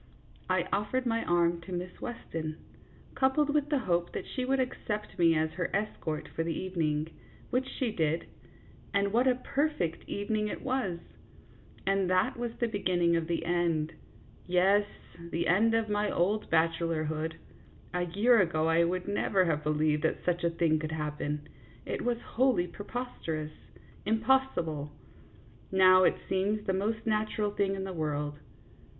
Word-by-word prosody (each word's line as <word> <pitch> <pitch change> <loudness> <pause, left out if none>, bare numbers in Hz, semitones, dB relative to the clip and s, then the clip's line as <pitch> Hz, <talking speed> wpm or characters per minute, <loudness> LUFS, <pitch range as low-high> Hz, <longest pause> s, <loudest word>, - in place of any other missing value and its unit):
I - - +2
offered 230 +6 0
my 230 -1 +1
arm 170 0 +2
to 175 +3 -10
Miss 180 0 -5
Weston, 160 -10 -5 0.6
coupled 275 +3 +2
with 295 -1 +1
the 295 - +2
hope 175 -8 0
that - - -4
she 255 - -3
would 270 +1 +1
accept 215 -6 -3
me 165 -1 +5
as 155 0 +1
her 180 0 -2
es 210 +2 -1
cort 155 -1 -3
for - - -3
the 165 -1 -2
evening, 160 -4 -1 0.4
which 260 +1 +1
she 250 -4 -2
did, 160 -4 0 0.7
and 200 0 +2
what 245 +3 +4
a 255 - +4
per 280 +4 0
fect 170 - -4
evening 210 +1 -1
it - - -5
was! 255 -10 -1 0.9
And 195 -1 +2
that 185 0 +2
was 240 -1 -3
the 240 - +1
beginning 180 -5 +1
of 165 -1 0
the 170 -1 -1
end 165 -2 +1 0.5
yes, 195 +3 +4 0.4
the 170 0 -1
end 225 +6 +4
of 225 -1 +1
my 210 0 0
old 205 +5 0
bachelorhood. 160 -1 0 0.6
A 180 0 0
year 210 +6 +4
ago 160 -3 +1
I 165 +1 +4
would 180 +2 -1
never 200 -2 +2
have 150 -3 0
believed 150 0 +1
that - - -1
such 175 -1 0
a 170 - +3
thing 165 -2 +2
could 155 0 -4
happen. 150 -1 -3 0.4
It - - -3
was 240 -1 0
wholly 250 -7 +2
preposterous, 170 -6 -5 0.5
impossible; 215 - +1 0.8
now 185 -1 +7
it - - +4
seems 205 +3 0
the 190 - +1
most 215 +4 -1
natural 215 -1 0
thing 200 -1 0
in 190 - -3
the 190 -1 -4
world. 150 -2 -2
185 Hz, 160 wpm, -30 LUFS, 165-215 Hz, 0.9 s, now